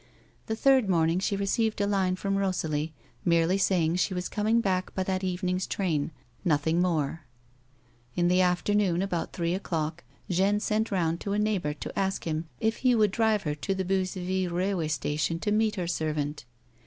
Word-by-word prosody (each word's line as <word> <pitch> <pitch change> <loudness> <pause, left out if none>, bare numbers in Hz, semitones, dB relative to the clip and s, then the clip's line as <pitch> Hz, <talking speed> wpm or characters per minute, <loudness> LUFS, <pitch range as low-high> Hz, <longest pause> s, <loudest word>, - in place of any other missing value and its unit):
The 220 - -1
third 260 -3 +4
morning 165 -1 +3
she 200 +1 0
received 215 +3 0
a 205 - +2
line 190 -2 +1
from 195 +1 -1
Rosalie 160 -5 -1 0.3
merely 170 +2 +3
saving 175 -3 +2
she 185 +1 0
was 180 0 -3
com 210 -1 -2
ing 230 +1 +4
back 185 -4 -1
by 190 - 0
that 185 0 -2
evening's 185 0 -1
train; 165 -7 -1 0.3
nothing 160 +1 +2
more; 165 -3 0 1.0
and 175 - +2
in - - +4
the 180 +1 +4
afternoon, 180 0 +2
about 180 -4 -2
three 170 -1 -1
o'clock, 165 -3 -3 0.2
Jeanne 195 +3 +2
sent 215 +1 0
round 170 -4 0
to 200 - -2
a - - +1
neighbour 200 -8 0
to - - -5
ask 195 0 -1
him 160 0 -2
if 225 0 +1
he 255 -2 +3
would 210 -3 +3
drive 220 -1 +2
her 150 - -1
to 150 +7 -2
the 190 -1 -2
Beuzeville 185 0 -1
railway 180 -1 0
station 150 +1 -1
to 205 +5 -2
meet 215 0 +2
her 180 -3 -2
servant. 150 -4 -2
185 Hz, 185 wpm, -28 LUFS, 165-200 Hz, 1.0 s, third